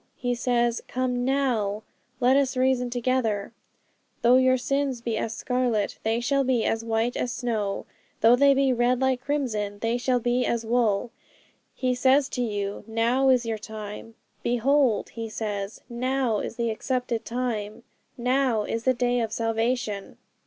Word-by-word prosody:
He 245 -1 -1
says, 240 -1 +1
"Come 250 -1 -1
now, 240 -6 0 0.4
let 255 +1 +4
us 275 -2 +1
reason 255 -1 +2
together; 240 -4 -1 0.7
though 240 +2 +6
your 260 0 +4
sins 275 0 -1
be 230 -1 -2
as 225 +1 -2
scarlet, 245 -4 -1
they 225 +1 0
shall 275 +3 +1
be 250 -3 +1
as 225 0 0
white 230 +1 0
as 245 - -1
snow; 220 -6 -2 0.4
though 230 +2 +7
they 280 +2 +5
be 270 -1 +3
red 245 +1 +2
like 260 -1 +1
crimson, 230 -8 -2
they 230 +3 -1
shall 250 0 +1
be 245 +1 +1
as 235 -2 -1
wool." 230 -1 +1 0.6
He 255 -1 0
says 265 +2 +3
to 250 - -3
you, 205 -3 -3
"Now 235 +4 +2
is 250 -2 +4
your 225 -1 -2
time." 215 +1 -8 0.3
"Behold," 245 -1 +2
He 225 0 -5
says, 205 -2 -4
"now 250 -2 0
is - - -5
the 235 -1 -1
accepted 245 0 -2
time, 230 -3 -3 0.3
now 250 -2 +1
is 230 +2 -3
the 260 -1 +3
day 245 0 +1
of 225 -2 -1
salvation." 225 -2 -2
240 Hz, 160 wpm, -26 LUFS, 225-255 Hz, 0.7 s, though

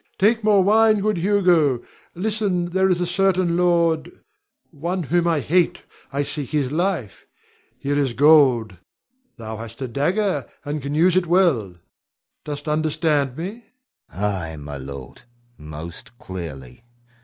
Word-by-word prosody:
Take 220 +3 +3
more 205 -2 +4
wine, 215 +2 +4
good 210 -1 0
Hugo. 175 - +2 0.3
Listen, 200 -2 -1
there 190 +1 +2
is 180 -1 +2
a - - +1
certain 185 -1 +1
lord, 170 -2 +2 0.6
one 170 +4 -3
whom 170 +4 +1
I 165 -4 +1
hate. 175 +4 +1 0.3
I 140 +1 -1
seek 140 -1 -5
his 145 -4 -1
life. 170 - -2 0.5
Here 145 +1 -1
is 135 -4 0
gold 130 - +4 0.6
thou 110 -1 -7
hast 115 +1 -9
a 130 - -3
dagger, 150 - 0 0.2
and 145 +1 -3
can 140 +2 -4
use 175 +3 +4
it 185 -2 +2
well. 160 - +2 0.7
Dost 145 0 -6
understand 150 -3 0
me? 205 +8 -6 0.5
Hugo. 100 - -3
Ay, 90 -6 -3
my 75 -1 -7
lord, 70 -1 -9 0.3
most 80 +8 -10
clearly. 80 - -8
155 Hz, 140 wpm, -22 LUFS, 120-180 Hz, 0.7 s, more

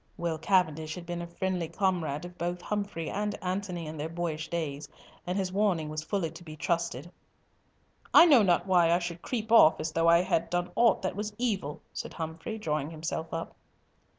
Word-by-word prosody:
Will 165 -2 -2
Cavendish 160 -3 +1
had 180 -2 -8
been 175 0 -4
a 170 - -5
friendly 180 0 -2
comrade 175 -5 -1
of 175 0 -10
both 175 +1 -3
Humfrey 200 -4 -3
and 210 +1 -2
Antony 185 -2 -3
in 155 +1 -7
their 150 +2 -3
boyish 165 -2 -3
days, 150 -4 -3 0.4
and 180 +2 -1
his 185 -2 -1
warning 190 -7 +1
was 155 0 -3
fully 165 0 -2
to 165 +2 -12
be 155 -2 -9
trusted. 170 -1 -2 1.0
"I - - +9
know 285 -8 +7
not 180 -4 +3
why 180 -3 +4
I 170 - +5
should 175 -1 -5
creep 225 -3 -3
off 195 -9 +7
as 160 +1 -2
though 165 +1 +2
I 170 +1 +6
had 165 - 0
done 175 0 -1
aught 235 -4 +4
that 185 - -1
was 210 +1 -4
evil," 200 -12 -2
said - - -6
Humfrey, 165 +7 -5
drawing 155 -7 -2
himself 160 0 -4
up. 165 0 -4
170 Hz, 195 wpm, -29 LUFS, 160-190 Hz, 1.0 s, I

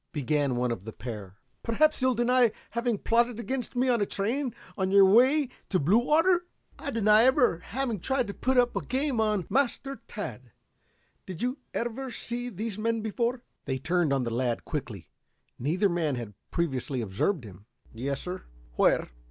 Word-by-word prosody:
began 145 -3 0
one 125 0 0
of 95 -5 -4
the 110 - -7
pair. 105 -5 -8 0.2
"Perhaps 305 +6 +2
you'll 255 -1 +3
deny 240 0 +4 0.2
having 235 -1 0
plotted 235 +2 +1
against 255 +1 -4
me 250 +1 +2
on 240 -3 +2
a - - +3
train 245 +7 -1 0.2
on 190 -1 0
your 195 0 +7
way 260 +9 +5 0.2
to 185 - +2
Bluewater." 305 - +3 0.3
"I - - -4
deny 215 -3 +5
ever 255 - +4
having 240 +1 -3
tried 265 +6 0
to 200 - -5
put 260 +4 0
up 245 -1 +3
a - - -1
game 260 -2 0
on 210 -5 +1
" - - -28
"Master 275 +1 0
Tad, - - -7 0.7
did 185 0 -5
you 250 +3 -1 0.2
ever 240 +3 -3
see 245 0 -4
these 215 0 -4
men 230 +1 0
before?" 235 +3 -1 0.2
They 130 - -1
turned 170 +2 +1
on 135 -2 +2
the 115 - -2
lad 120 -1 -1
quickly. 115 - -5 0.5
Neither 170 - +2
man 165 -6 0
had 115 -4 -6 0.2
previously 135 -5 -1
observed 115 - -1
him. 100 0 -13 0.3
"Yes, 135 +4 -3
sir." 180 +1 -6 0.3
"Where?" - - +3
215 Hz, 175 wpm, -28 LUFS, -, 0.7 s, your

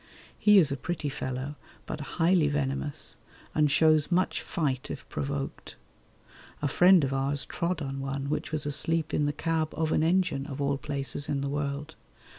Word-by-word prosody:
He 210 -1 +6
is 155 -7 +5
a 140 - -1
pretty 150 +2 -3
fellow 135 +1 -4 0.3
but 150 - -5 0.2
highly 170 -2 +4
venomous, 145 0 -1 0.4
and 150 -1 +3
shows 155 +2 +4
much 180 +1 +1
fight 140 -7 -2
if - - -7
provoked. 140 0 -4 0.8
A 145 - 0
friend 180 +3 +6
of 135 0 -1
ours 135 +1 +2
trod 170 -2 -2
on 135 0 -4
one 135 0 -3
which 150 - -2
was 155 -2 -2
asleep 160 +2 0
in 150 - +2
the - - +1
cab 160 +1 -1
of 160 -1 0
an - - +2
engine, 165 -4 +1
of 140 -2 -6
all 140 -1 0
places 140 -2 -1
in 140 -1 0
the 140 - -2
world. 145 0 -3
145 Hz, 175 wpm, -28 LUFS, 140-160 Hz, 0.8 s, He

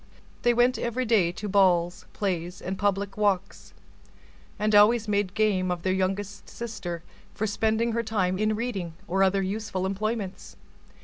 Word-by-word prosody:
They 240 - +4
went 245 +2 +3
every 240 +2 -1
day 210 -7 +3
to 210 +4 -5
balls, 180 -2 +2
p1ays, 180 -2 -2
and 190 +2 -4
public 200 0 -1
walks, 200 -2 -1 0.9
and 210 +1 0
always 215 +2 +5
made 205 -2 0
game 200 -4 +2
of 175 -1 -2
their 185 - +1
youngest 195 +2 -2
sister 200 -8 -6 0.3
for 220 - -1
spending 220 +2 +1
her 230 +1 0
time 195 -5 -1
in 215 0 +1
reading 200 -8 -3
or 190 +2 0
other 195 0 +3
useful 195 -1 -3
employments. 200 0 -3
200 Hz, 150 wpm, -26 LUFS, 185-215 Hz, 0.9 s, always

